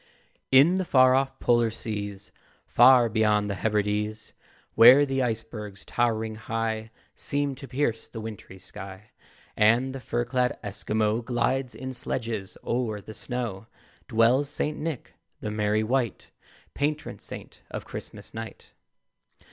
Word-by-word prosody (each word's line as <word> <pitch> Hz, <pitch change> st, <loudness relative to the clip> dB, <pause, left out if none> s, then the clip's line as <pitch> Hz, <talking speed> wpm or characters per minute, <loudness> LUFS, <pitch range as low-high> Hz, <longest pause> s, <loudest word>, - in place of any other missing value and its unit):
In 150 Hz, +8 st, +6 dB
the -, -, +1 dB
far 130 Hz, -6 st, +5 dB
off 135 Hz, +1 st, +1 dB
Polar 120 Hz, -1 st, +3 dB
seas, 105 Hz, -3 st, -5 dB, 0.3 s
Far 125 Hz, 0 st, +6 dB
beyond 105 Hz, -2 st, +2 dB
the 95 Hz, -2 st, -5 dB
Hebrides, 105 Hz, 0 st, -1 dB, 0.4 s
Where 125 Hz, +6 st, +8 dB
the 135 Hz, -1 st, -1 dB
icebergs, 110 Hz, -4 st, -4 dB
towering 110 Hz, -2 st, 0 dB
high, 110 Hz, 0 st, -3 dB, 0.2 s
Seem 145 Hz, -1 st, -1 dB
to 135 Hz, +1 st, -10 dB
pierce 125 Hz, -3 st, -2 dB
the 115 Hz, -, -7 dB
wintry 110 Hz, -3 st, -8 dB
sky, 95 Hz, +2 st, -10 dB, 0.4 s
And 120 Hz, +5 st, +3 dB
the 135 Hz, -, -5 dB
fur 120 Hz, -1 st, -2 dB
clad 125 Hz, 0 st, 0 dB
Esquimaux 105 Hz, +2 st, -1 dB
Glides 125 Hz, +2 st, -1 dB
in 130 Hz, 0 st, -6 dB
sledges 115 Hz, -5 st, -3 dB
o'er 115 Hz, -3 st, -1 dB
the 110 Hz, +2 st, -10 dB
snow, 110 Hz, -1 st, -4 dB, 0.4 s
Dwells 125 Hz, +4 st, +3 dB
St. 150 Hz, +1 st, -1 dB
Nick, 155 Hz, -5 st, -5 dB, 0.3 s
the 105 Hz, -, -4 dB
merry 105 Hz, 0 st, +1 dB
wight, 120 Hz, -1 st, -1 dB, 0.4 s
Patron 150 Hz, +2 st, -2 dB
saint -, -, -10 dB
of -, -, -6 dB
Christmas -, -, -9 dB
night. 115 Hz, 0 st, -8 dB
115 Hz, 130 wpm, -26 LUFS, 105-130 Hz, 0.4 s, Where